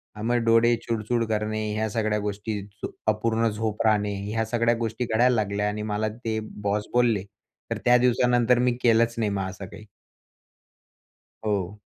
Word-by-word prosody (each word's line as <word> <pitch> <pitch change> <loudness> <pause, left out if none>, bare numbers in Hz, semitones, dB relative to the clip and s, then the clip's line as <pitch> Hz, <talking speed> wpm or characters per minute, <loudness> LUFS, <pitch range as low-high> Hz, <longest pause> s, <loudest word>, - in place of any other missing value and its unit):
अ, 105 - -8
मग 120 +2 +1
डोळे 115 +1 +5
चुडचूड 115 +1 0
करणे, 110 0 -1
ह्या 110 0 -1
सगळ्या 105 -1 0
गोष्टी, 105 +1 -3 0.2
झ - - 0 0.2
अपूर्ण 110 +1 +1
झोप 110 +1 -2
राहणे, 105 -1 +2 0.2
ह्या 115 0 0
सगळ्या 115 +1 +1
गोष्टी 115 +1 -2
घडायला 120 +3 +3
लागल्या 105 -1 0
आणि 105 +1 -4
मला 110 +1 0
ते 110 0 -3 0.2
बॉस 105 +1 0
बोलले. 120 -5 +3 0.5
तर 115 - 0
त्या 125 0 +6
दिवसानंतर 125 0 +3
मी 125 0 +3
केलंच 115 0 +3
नाही 110 -2 +1
मग 95 -1 -2
असं 95 +1 -8
काही. 105 +2 -12 1.6
हो. 100 -1 -2
110 Hz, 160 wpm, -25 LUFS, 105-115 Hz, 1.6 s, त्या